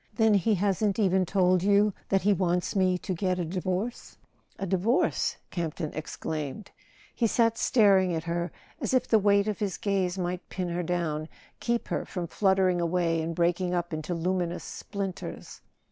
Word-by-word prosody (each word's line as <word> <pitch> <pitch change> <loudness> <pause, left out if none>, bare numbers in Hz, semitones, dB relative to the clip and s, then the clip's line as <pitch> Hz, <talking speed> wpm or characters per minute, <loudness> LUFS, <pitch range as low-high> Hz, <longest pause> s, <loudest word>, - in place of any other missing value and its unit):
"Then 220 -1 +4
he 205 +2 +3
hasn't 200 +1 +1
even 190 -4 +2
told 185 -1 +3
you 205 +1 +4 0.2
that 195 -1 +2
he 205 +1 +4
wants 180 0 0
me 185 -2 +3
to 185 +1 -4
get 185 +1 0
a 175 - -1
divorce? 185 +6 -3 0.2
" - - -37
"A 195 - -3
divorce?" 195 +7 +1
Campton 165 -2 -3
exclaimed. 155 +3 -5 0.4
He 235 - +1
sat 230 0 +2
staring 195 -7 +4
at 160 - -3
her 170 0 -2 0.3
as - - 0
if 255 - +2
the 220 - +4
weight 200 0 +3
of 210 - -2
his 205 -3 -2
gaze 195 -2 0
might 180 0 -3
pin 180 -2 -3
her 175 +1 -1
down, 165 -3 -2 0.3
keep 235 0 -1
her - - -1
from 180 -2 -4
fluttering 190 0 +2
away 170 -1 +1
and 165 +1 -3
breaking 175 +1 +1
up 175 -1 -2
into 155 +3 -3
luminous 175 0 -1
splinters. 195 -2 -6
185 Hz, 175 wpm, -28 LUFS, 175-200 Hz, 0.4 s, Then